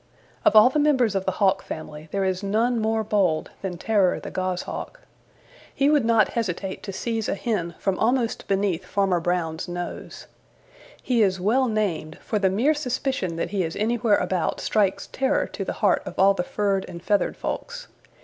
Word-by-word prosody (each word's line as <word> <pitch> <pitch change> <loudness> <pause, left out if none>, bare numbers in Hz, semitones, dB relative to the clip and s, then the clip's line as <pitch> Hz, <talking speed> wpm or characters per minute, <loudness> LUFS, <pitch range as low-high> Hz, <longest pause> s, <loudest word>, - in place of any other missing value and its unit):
Of - - +4
all 215 +4 +8
the 300 - +1
members 260 -7 +3
of 190 -1 -1
the 190 - 0
Hawk 195 0 +2
family 155 0 -8
there 195 -1 0
is 185 0 -1
none 225 +4 +1
more 220 0 0
bold 195 -7 +1
than 185 -3 -4
Terror 195 -1 +2
the - - -8
Goshawk. 185 -1 -4 0.7
He 280 +2 +2
would 290 -6 +3
not 225 -2 +4
hesitate 195 -4 -3
to 200 - -6
seize 225 +2 -2
a - - 0
hen 185 -6 -2
from 195 -2 -1
almost 235 0 0
beneath 195 -3 0
Farmer 195 -3 +1
Brown's 165 -1 -2
nose. 175 0 -6 0.8
He 245 -3 +2
is 190 -3 +2
well 240 +8 +2
named, 205 -8 -2
for 215 - -1
the 195 -1 +3
mere 235 +11 +2
suspicion 255 - -2
that 165 - -3
he 200 -2 0
is 165 -1 -4
anywhere 225 0 +2
about 180 -3 -1
strikes 200 -3 +1
terror 270 +2 0
to - - -5
the - - -3
heart - - +4
of - - -7
all 195 +1 +5
the 195 - -1
furred 195 +1 -1
and 170 -1 -9
feathered 205 +1 +1
folks. - - -5
200 Hz, 185 wpm, -24 LUFS, 185-230 Hz, 0.8 s, all